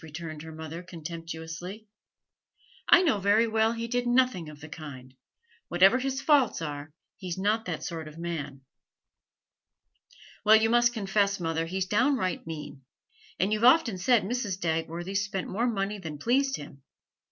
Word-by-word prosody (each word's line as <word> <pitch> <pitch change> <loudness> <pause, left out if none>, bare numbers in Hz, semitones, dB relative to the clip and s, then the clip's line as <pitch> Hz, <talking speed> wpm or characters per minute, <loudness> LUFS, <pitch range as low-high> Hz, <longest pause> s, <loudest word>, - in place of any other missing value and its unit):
returned 160 0 -7
her 160 0 -9
mother, 160 +1 -7
contemptuously. 170 +3 -7 1.0
'I - - +8
know 270 - +2
very 205 +4 +3
well 220 0 +2
he 230 0 -4
did 245 +1 -1
nothing 240 -10 +2
of 150 -1 -12
the 155 - -10
kind; 140 -5 -10 0.5
whatever 190 +8 +5
his 270 0 -2
faults 280 -7 +3
are, 150 -1 -5 0.3
he's 180 -2 -5
not 210 +4 +1
that 170 -4 -4
sort 165 -3 -5
of 155 +1 -11
man.' 150 -5 -5 1.8
'Well, 215 0 +7
you 220 +1 +3
must 240 0 +4
confess, 200 -2 +1
mother, 165 -1 -1
he's 190 +2 -2
downright 210 - +1
mean; 150 -4 -7 0.6
and 195 +3 +2
you've 215 +1 -1
often 250 -2 +6
enough 185 - -6
said 240 +2 +4
Mrs. 210 -2 -2
Dagworthy 165 +3 -2
spent 195 -1 -1
more 230 +6 0
money 205 -2 -2
than 160 -5 -6
pleased 270 - +1
him. 140 -1 -10
190 Hz, 155 wpm, -28 LUFS, 160-225 Hz, 1.8 s, I